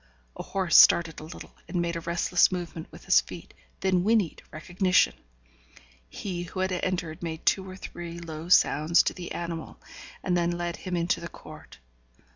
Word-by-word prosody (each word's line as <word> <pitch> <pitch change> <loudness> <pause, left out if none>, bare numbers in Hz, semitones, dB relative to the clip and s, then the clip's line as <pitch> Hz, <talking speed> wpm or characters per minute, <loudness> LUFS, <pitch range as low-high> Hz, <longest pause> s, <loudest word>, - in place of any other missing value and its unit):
A - - -6
horse 185 -4 +2
started 165 -2 +6
a - - -10
little, 160 - -11
and 180 - -2
made 170 0 -1
a - - -2
restless 170 +2 +2
movement 170 -2 -6
with - - -14
his - - +5
feet, - - -11 0.3
then 185 -2 +2
whinnied 210 -5 +1
recognition. 180 +4 +1 1.0
He 180 - -5
who 180 +2 -5
had 190 0 0
entered 175 -3 -3
made 160 -2 -5
two 190 -1 +1
or 185 - -8
three 170 -2 -8
low 165 0 -8
sounds 165 -1 +4
to - - -1
the 175 -2 -8
animal, 170 -2 -6 0.4
and 180 - 0
then 175 0 0
led 175 -1 -3
him 180 -1 -4
into 170 +1 0
the - - -6
court. - - -13
175 Hz, 175 wpm, -27 LUFS, 170-185 Hz, 1.0 s, started